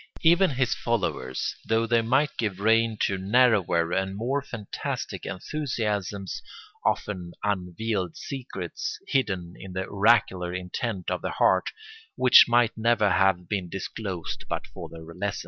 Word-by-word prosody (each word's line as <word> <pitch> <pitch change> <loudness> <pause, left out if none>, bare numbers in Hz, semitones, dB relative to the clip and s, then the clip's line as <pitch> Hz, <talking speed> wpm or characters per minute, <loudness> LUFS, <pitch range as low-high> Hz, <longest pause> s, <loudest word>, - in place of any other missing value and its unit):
Even 170 +3 +5
his 130 -3 +1
followers, 90 - -2
though 115 0 +2
they 115 0 +3
might 135 +6 +2
give 105 -4 -2
rein 115 +1 +3
to 95 -1 +1
narrower 95 -6 +3
and 95 +1 -1
more 130 +6 0
fantastic 115 -6 -5
enthusiasms, 105 - -3 0.4
often 90 -4 -1
unveiled 95 -1 -2
secrets, 125 - -5
hidden 95 -10 -1
in 95 -1 -10
the 95 0 -2
oracular 95 -4 +2
intent 90 +2 -3
of - - -1
the - - -2
heart, - - +2 0.5
which 130 -1 +8
might 120 -1 +3
never 110 -2 +2
have 95 -2 +2
been 95 -3 -2
disclosed 95 -1 -5
but - - -2
for - - -9
their 80 -1 -10
lessons. 100 +5 -4
105 Hz, 135 wpm, -26 LUFS, 90-120 Hz, 0.5 s, which